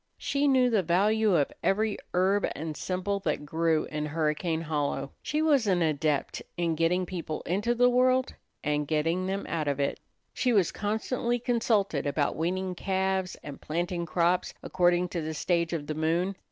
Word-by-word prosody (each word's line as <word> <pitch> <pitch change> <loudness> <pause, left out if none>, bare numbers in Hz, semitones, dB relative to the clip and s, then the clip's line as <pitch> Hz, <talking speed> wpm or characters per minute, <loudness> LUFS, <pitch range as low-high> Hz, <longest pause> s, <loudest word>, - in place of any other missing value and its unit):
She 285 +1 0
knew 255 -2 +4
the 215 -3 +3
value 205 +4 +2
of 145 -4 +2
every 215 +2 +1 0.2
herb 195 +3 +3
and 155 0 -5
simple 185 +4 -2
that 155 -5 -2
grew 160 +1 +1
in 150 0 -3
Hurricane 160 +2 -1
Hollow. 145 -3 -2
She 305 +1 -1
was 285 -8 +3
an 180 -3 +3
adept 150 -2 0 0.2
in 170 -1 +1
getting 165 +3 +1
people 170 -4 -5
into 205 +7 0
the 245 +1 +5
world 255 +1 +3 0.3
and 150 0 0
getting 165 +4 0
them 195 +1 -2
out 160 -3 -2
of 140 -1 0
it. 140 - -1 0.3
She 250 -2 +1
was 195 -6 +3
constantly 235 +3 -1
consulted 225 - 0
about 145 +1 0
weaning 185 +3 -1
calves, 190 0 -1
and 145 -2 -8
planting 170 +2 -2
crops 175 +2 +1
according 175 0 +2
to 175 - -3
the 155 0 -4
stage 170 +1 0
of 160 -4 -3
the 155 - -3
moon. 165 +5 0
175 Hz, 170 wpm, -28 LUFS, 155-205 Hz, 0.3 s, the